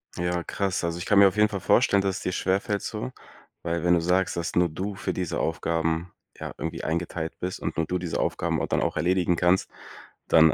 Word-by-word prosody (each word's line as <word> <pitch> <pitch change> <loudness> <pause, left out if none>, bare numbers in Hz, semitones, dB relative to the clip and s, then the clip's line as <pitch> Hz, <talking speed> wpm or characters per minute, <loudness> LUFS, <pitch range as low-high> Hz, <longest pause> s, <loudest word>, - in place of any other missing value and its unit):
Ja, 90 0 -1
krass, 95 0 -2
also 85 0 -1
ich 90 - -5
kann 105 - +4
mir 100 - +9
auf 95 - -1
jeden 105 0 +4
Fall 100 -2 -3
vorstellen, 100 +1 +4
dass 95 -1 -1
es - - -7
dir 90 - -1
schwerfällt 95 +2 0
so, 60 +1 -4 0.5
weil 85 -1 -2
wenn 90 0 +4
du 85 - +4
sagst, 90 +3 +1
dass 85 - -3
nur 90 0 +4
du 95 +6 -4
für 95 - -3
diese 90 -3 -2
Aufgaben, 80 +1 -1 0.3
ja - - -5
irgendwie - - -4
eingeteilt 80 0 -2
bist 90 +1 -3
und - - -4
nur 80 -1 0
du 90 - 0
diese 90 -2 -3
Aufgaben - - 0
au - - -1
dann - - +1
auch - - -1
erledigen 90 +1 +2
kannst, 90 +2 +2 0.6
dann, 80 -1 +6
90 Hz, 230 wpm, -26 LUFS, 85-95 Hz, 0.6 s, mir